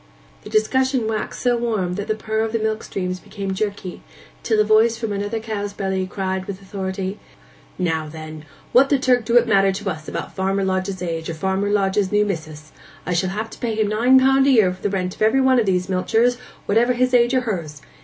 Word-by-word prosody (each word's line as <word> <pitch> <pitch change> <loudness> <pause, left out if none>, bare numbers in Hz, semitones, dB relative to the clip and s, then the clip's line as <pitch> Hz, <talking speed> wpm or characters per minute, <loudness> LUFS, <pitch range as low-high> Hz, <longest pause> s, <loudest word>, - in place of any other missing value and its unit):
The - - -11
discussion 260 - +1
waxed 220 -1 -3
so 245 -1 +2
warm 215 -7 -1
that 205 +2 -4
the 215 - 0
purr 220 0 -3
of 220 0 -1
the - - +2
milk 220 0 -1
streams 185 -1 -4
became 195 0 -5
jerky, 200 -2 -4 0.4
till 220 -2 +1
a - - +6
voice 220 +2 +4
from 225 -3 -3
another 205 +3 -2
cow's 210 -2 -4
belly 190 -2 -2
cried 190 -1 -3
with 195 -1 -6
authority, 190 0 -5 0.6
'Now 160 -4 -1
then, 155 0 -9 0.3
what 270 +3 +5
the 280 - +4
Turk 250 -3 +2
do 235 +2 +3
it 240 0 +4
matter 195 -2 +4
to 195 +1 -3
us 155 -2 -8
about - - -5
Farmer 195 +1 0
Lodge's 185 0 -2
age, 165 -2 -3
or 165 - -4
Farmer 190 +4 -1
Lodge's 200 -1 +1
new 210 0 +3
mis'ess? 155 -5 -6 0.3
I 180 - -1
shall 180 +2 +1
have 215 +3 -4
to - - -11
pay 230 -2 -2
him 215 -1 +1
nine 245 +5 +5
pound 270 +1 +4
a - - +5
year 215 -9 +4
for 185 - -15
the 205 - 0
rent 185 -2 -2
of - - -21
every 220 +5 +4
one 260 -1 +4
of 220 - 0
these 180 -1 +1
milchers, 225 +6 +1 0.3
whatever 235 +4 +3
his 255 +1 +1
age 240 +1 +4
or 255 - +3
hers. 165 - -5
205 Hz, 225 wpm, -21 LUFS, 185-230 Hz, 0.6 s, a